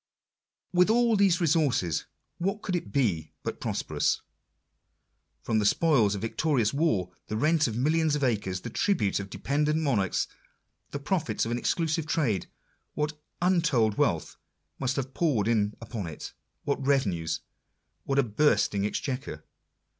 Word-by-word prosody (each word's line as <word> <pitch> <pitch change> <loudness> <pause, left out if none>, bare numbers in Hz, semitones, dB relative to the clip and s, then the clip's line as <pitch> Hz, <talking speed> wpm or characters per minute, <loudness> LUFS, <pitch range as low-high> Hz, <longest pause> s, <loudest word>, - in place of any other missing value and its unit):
With 180 +2 +4
all 235 0 +4
these 195 -3 +4
resources, 140 - +1 0.3
what 195 +4 -2
could 185 - -1
it 175 - -4
be 95 - 0
but - - -4
prosperous? - - -1 1.2
From 110 -1 +1
the - - +1
spoils 120 -9 +3
of 100 - -5
victorious 120 -1 +1
war, 110 - +1 0.2
the 110 - -3
rent 155 +4 +3
of 115 -1 -3
millions 155 +3 +2
of 145 - -2
acres, 100 -7 0
the 115 - -6
tribute 110 - +1
of 100 -1 -6
dependent 150 +7 0
monarchs, 115 - +1 0.6
the - - -4
profits 150 - -1
of 115 - -3
an 120 - 0
exclusive 160 +2 0
trade, 140 - 0 0.5
what 150 +1 -1 0.3
untold 165 - +2
wealth - - 0 0.4
must 130 -1 0
have 135 -1 -3
poured 130 - +1
in 105 -3 +1
upon 110 -5 -5
it! 80 - -8 0.3
what 140 -1 -1
revenues! 100 - 0 0.6
what 135 - -1
a 140 - +5
bursting 105 -4 +2
exchequer 125 - -4
135 Hz, 145 wpm, -28 LUFS, 105-160 Hz, 1.2 s, a